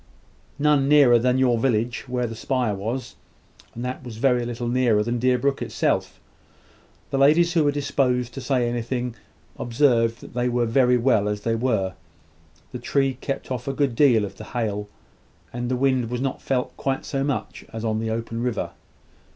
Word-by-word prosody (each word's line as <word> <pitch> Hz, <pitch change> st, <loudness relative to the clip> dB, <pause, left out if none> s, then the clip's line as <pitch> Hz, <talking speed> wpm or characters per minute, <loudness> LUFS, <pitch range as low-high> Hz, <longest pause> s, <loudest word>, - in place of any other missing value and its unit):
None 145 Hz, -2 st, +3 dB
nearer 140 Hz, -5 st, +6 dB
than 125 Hz, +2 st, +2 dB
you 130 Hz, -2 st, +3 dB
village 120 Hz, -1 st, 0 dB
where 125 Hz, 0 st, -1 dB
the 115 Hz, -, -4 dB
spire 125 Hz, -1 st, -1 dB
was, 115 Hz, +6 st, -4 dB, 0.6 s
and 120 Hz, +2 st, -5 dB
that 125 Hz, 0 st, -4 dB
was 115 Hz, -3 st, -8 dB
very 125 Hz, 0 st, +2 dB
little 120 Hz, 0 st, -4 dB
nearer 120 Hz, -4 st, +2 dB
than 120 Hz, +2 st, -2 dB
Deerbrook 130 Hz, +3 st, +1 dB
itself. -, -, -1 dB, 0.9 s
The 135 Hz, -, 0 dB
ladies 165 Hz, +5 st, +5 dB
who 165 Hz, -3 st, +3 dB
were 145 Hz, -, +3 dB
disposed 130 Hz, -4 st, 0 dB
to 135 Hz, -, -6 dB
say 125 Hz, -2 st, +1 dB
anything, 120 Hz, +1 st, -2 dB, 0.5 s
observed 120 Hz, -2 st, +2 dB
that -, -, -12 dB
they 125 Hz, +1 st, 0 dB
were 120 Hz, 0 st, +1 dB
very 125 Hz, +1 st, +3 dB
well 115 Hz, -4 st, +2 dB
as 105 Hz, 0 st, -3 dB
they 115 Hz, +2 st, 0 dB
were: 110 Hz, -6 st, 0 dB, 0.8 s
the -, -, -6 dB
tree 135 Hz, -1 st, +1 dB
kept 135 Hz, -1 st, -4 dB
off 125 Hz, 0 st, -4 dB
a 135 Hz, -, -1 dB
great 140 Hz, -2 st, 0 dB
deal 115 Hz, -5 st, +4 dB
of 100 Hz, -, -10 dB
the -, -, -8 dB
hail, 105 Hz, -4 st, -3 dB, 0.6 s
and 120 Hz, 0 st, -3 dB
the 130 Hz, -, +1 dB
wind 130 Hz, -2 st, +1 dB
was 125 Hz, 0 st, -3 dB
not 135 Hz, 0 st, -2 dB
felt 130 Hz, -2 st, -1 dB
quite 135 Hz, -1 st, -2 dB
so 135 Hz, -1 st, -2 dB
much 140 Hz, -1 st, -3 dB
as 115 Hz, 0 st, -5 dB
on 110 Hz, -1 st, 0 dB
the 110 Hz, 0 st, -2 dB
open 115 Hz, +1 st, -3 dB
river. 120 Hz, -3 st, -2 dB
125 Hz, 185 wpm, -24 LUFS, 115-135 Hz, 0.9 s, nearer